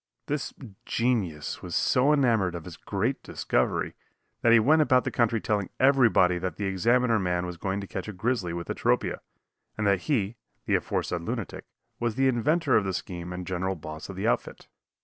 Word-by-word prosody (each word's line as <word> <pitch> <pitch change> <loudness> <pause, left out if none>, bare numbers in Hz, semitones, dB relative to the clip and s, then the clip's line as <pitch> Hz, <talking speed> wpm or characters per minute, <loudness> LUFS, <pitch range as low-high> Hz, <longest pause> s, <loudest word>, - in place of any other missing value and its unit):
This 145 -1 -2 0.3
genius 100 -11 -1
was 90 -2 -5
so 130 +3 +3
enamored 115 -11 +2
of 85 - -6
his 90 -3 -8
great - - -2
discovery - - -1 0.5
that 115 - +4
he 115 - +8
went 155 +8 +4
about 130 -4 +4
the - - -2
country 115 -1 +2
telling 105 -3 -1
everybody 120 -10 +4
that 90 +1 -3
the 100 - -3
Examiner 115 +5 +2
man 90 -2 0
was 90 -1 -5
going 95 +3 -2
to - - -6
catch - - -5
a - - -4
grizzly 105 -2 -1
with 85 0 -5
atropia, - - 0 0.6
and 110 - -1
that 100 -2 +3
he 115 -5 0 0.3
(the - - 0
aforesaid 85 - -1
lunatic) 115 +2 -5 0.3
was 120 -2 -1
the 135 0 +3
inventor 140 +4 +2
of 105 - +4
the 95 -1 -2
scheme 90 -1 -5
and 90 0 -5
general 95 +1 -2
boss 80 -1 -8
of - - -7
the - - -2
outfit. - - -2
105 Hz, 190 wpm, -27 LUFS, 90-125 Hz, 0.6 s, he